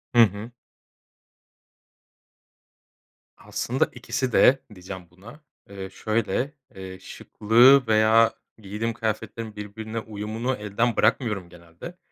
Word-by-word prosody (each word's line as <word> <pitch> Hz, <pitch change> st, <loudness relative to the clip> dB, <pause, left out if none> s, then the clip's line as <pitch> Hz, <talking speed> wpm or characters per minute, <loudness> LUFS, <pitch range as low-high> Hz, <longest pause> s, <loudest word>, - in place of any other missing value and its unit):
Hı 120 Hz, -, +8 dB
hı. 105 Hz, +2 st, +1 dB, 2.9 s
Aslında -, -, -1 dB
ikisi 130 Hz, -2 st, -3 dB
de 135 Hz, +4 st, +5 dB
diyeceğim 90 Hz, -1 st, -9 dB
buna. 105 Hz, -, -15 dB, 0.3 s
Eee, 95 Hz, -1 st, -7 dB
şöyle, 115 Hz, +6 st, -2 dB, 0.2 s
eee, 95 Hz, -1 st, -9 dB
şıklığı 120 Hz, +8 st, +4 dB
veya 110 Hz, +1 st, +4 dB, 0.2 s
giydiğim 110 Hz, +2 st, -4 dB
kıyafetlerin 110 Hz, 0 st, -4 dB
birbirine 110 Hz, +2 st, -6 dB
uyumunu 110 Hz, +4 st, -4 dB
elden 105 Hz, +3 st, -1 dB
bırakmıyorum 105 Hz, -8 st, +1 dB
genelde. 85 Hz, -, -12 dB
110 Hz, 95 wpm, -24 LUFS, 100-115 Hz, 2.9 s, Hı